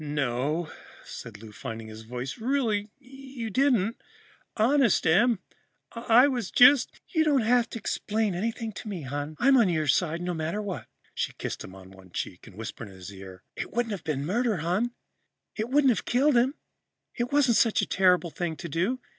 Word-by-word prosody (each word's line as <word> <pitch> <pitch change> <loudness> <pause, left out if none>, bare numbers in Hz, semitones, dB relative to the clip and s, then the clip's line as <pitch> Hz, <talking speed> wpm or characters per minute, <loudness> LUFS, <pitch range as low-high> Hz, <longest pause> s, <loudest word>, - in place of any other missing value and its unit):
"No," 145 +2 -1 0.3
said 115 -3 -9
Lou, 110 - -10
finding 115 0 -7
his 110 0 -10
voice, 125 - -6
"really 225 -4 0
you 265 -3 -8
didn't. 235 -3 +2 0.6
Honest, 240 -1 +3
Em, 215 +8 +4 0.5
I 235 +3 +5
was 245 -7 -2
just 255 +2 +5
" - - -41
"You 320 -2 +4
don't 290 -4 +3
have 240 +1 +2
to - - -6
explain 215 -2 -1
anything 225 +4 -3
to 215 - -9
me, 190 -7 -5
hon. 145 +3 -4
I'm 270 +6 +5
on 225 -6 +4
your 160 -3 0
side, 160 +4 +1
no 180 0 -2
matter 165 +5 -2
what." 205 -3 -5 0.3
She - - -2
kissed - - -5
him 95 - -11
on 95 0 -13
one 95 -1 -16
cheek 90 +3 -6
and 105 - -14
whispered 110 0 -7
in 95 - -13
his 95 +2 -10
ear, 95 -1 -11
"It - - -5
wouldn't 235 -1 -1
have 195 -5 -5
been 140 -3 -2
murder, 220 +4 0
hon. 180 +9 0 0.7
It 220 +2 -3
wouldn't 275 -1 +4
have 230 - -2
killed 275 +3 +3
him. 255 +4 +3 0.6
It 240 0 -3
wasn't 275 -5 +4
such 225 - +3
a - - +1
terrible 180 -2 +3
thing 170 -1 -3
to 170 - -7
do. 185 - -1
205 Hz, 190 wpm, -27 LUFS, 145-240 Hz, 0.7 s, I